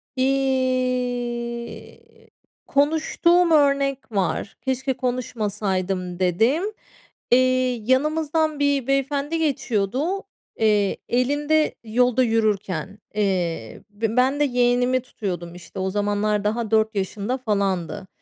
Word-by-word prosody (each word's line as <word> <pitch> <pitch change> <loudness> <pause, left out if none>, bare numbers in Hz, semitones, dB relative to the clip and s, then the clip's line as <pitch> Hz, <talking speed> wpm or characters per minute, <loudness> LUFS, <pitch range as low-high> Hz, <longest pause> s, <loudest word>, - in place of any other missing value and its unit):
İii, 255 -3 -1 0.7
konuştuğum 320 +4 +3
örnek 275 -4 +2
var. 195 0 -2
"Keşke 265 0 -1
konuşmasaydım." 200 -7 -2
dediğim. 225 - +2 0.7
İii, 255 -2 +2
yanımızdan 310 +2 +1
bir 285 -3 +1
beyefendi 280 +3 0
geçiyordu, 275 - -1 0.4
eee, 210 -3 +2
elinde 290 +5 +1
yolda 250 +3 +2
yürürken. 205 -5 0 0.2
Eee, 175 - -1
b 220 +3 -3
ben 265 +3 +3
de 295 - +4
yeğenimi 245 -1 +2
tutuyordum, 180 -8 -5
işte, 175 +1 -10
o 190 - -1
zamanlar 205 +1 0
daha 220 +1 -1
4 220 0 +2
yaşında 205 +5 -2
falandı. 200 -7 -1
245 Hz, 95 wpm, -23 LUFS, 205-275 Hz, 0.7 s, de